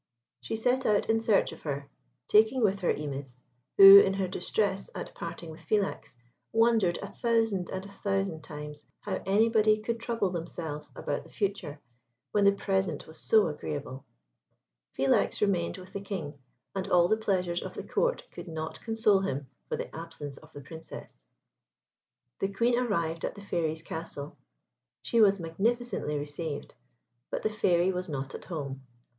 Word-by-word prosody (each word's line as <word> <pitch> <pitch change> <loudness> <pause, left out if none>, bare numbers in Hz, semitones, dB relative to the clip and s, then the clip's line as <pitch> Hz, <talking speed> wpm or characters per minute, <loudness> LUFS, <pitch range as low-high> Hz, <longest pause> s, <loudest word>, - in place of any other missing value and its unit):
She 120 - -4
set 250 +4 +1
out 210 -1 +2
in 225 0 +2
search 225 -3 +3
of - - -11
her, 140 -2 -4 0.4
taking 220 +4 +4
with 200 -1 +2
her 180 - +2
Imis, 135 -4 -5 0.4
who, 195 0 +12
in 195 -1 +3
her 195 -1 0
distress 195 +2 -1
at - - -6
parting 165 -2 -7
with 160 +2 -12
Philax, 195 -5 -1 0.4
wondered 225 -6 +3
a - - -7
thousand 225 -6 +1
and 190 0 -4
a 200 - -11
thousand 195 -5 -2
times 150 0 -8 0.2
how - - -3
anybody 215 +1 +4
could 230 +2 -3
trouble 230 -5 -1
themselves 165 -3 -5
about 145 - -3
the - - -16
future 195 -7 -3 0.5
when 205 -1 +3
the 200 - +8
present 190 -5 -1
was 160 - -12
so 220 -2 +4
agreeable. 145 -3 -5 0.9
Philax 135 0 +2
remained 185 -4 +1
with 185 0 -12
the 200 - -4
King, 185 -8 -5 0.4
and 190 -1 -3
all 175 -1 +5
the 215 - +3
pleasures 185 -5 0
of - - -7
the - - -5
Court - - 0
could - - -9
not 160 -1 -5
console 225 -3 +3
him 145 -8 -2 0.2
for - - -1
the - - -6
absence 155 -4 -7
of 155 - -16
the 145 - -9
Princess. 160 +4 -11 1.2
The 195 - -1
Queen 235 +5 +2
arrived 170 -9 -1
at - - -2
the 200 - -10
Fairy's 160 -3 -1
castle. 160 -3 -6 0.7
She 235 - +2
was 200 -2 +5
magnificently 195 -1 -1
received; 145 +1 -5 0.6
but - - -3
the 215 - +1
Fairy 185 -3 +2
was 180 0 -4
not 135 -2 -4
at - - -8
home. 140 -6 -5
190 Hz, 165 wpm, -29 LUFS, 155-210 Hz, 1.2 s, who